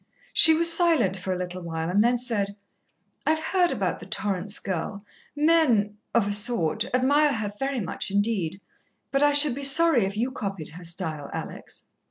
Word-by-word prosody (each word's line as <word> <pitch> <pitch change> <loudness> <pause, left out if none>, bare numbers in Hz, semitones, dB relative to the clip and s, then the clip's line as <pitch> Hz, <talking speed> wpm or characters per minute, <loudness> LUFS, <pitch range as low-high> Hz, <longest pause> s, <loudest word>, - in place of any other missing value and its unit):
She 320 -1 +7
was 335 +1 +4
silent 320 - +2
for 190 0 -5
a 185 - -2
little 180 0 -6
while 165 -1 -5
and 195 +4 +2
then 245 +1 +1
said, 215 -5 -2 0.7
"I've 315 - +2
heard 350 +3 0
about - - -3
the - - -12
Torrance 200 0 -2
girl. 195 +2 -5 0.3
Men 280 -10 +1 0.2
of 230 -4 +2
a 205 - -1
sort 205 -1 0
admire 285 +4 +2
her 210 -2 -4
very 270 -2 -2
much 185 - -4
indeed, 200 -3 -2 0.5
but 275 0 0
I 290 0 +4
should 290 -2 +6
be 280 - -6
sorry 280 -2 +6
if 195 +2 -5
you 245 +4 -2
copied 195 - -6
her 175 +3 -12
style, 165 -4 -5
Alex." - - -8
215 Hz, 180 wpm, -24 LUFS, 190-280 Hz, 0.7 s, She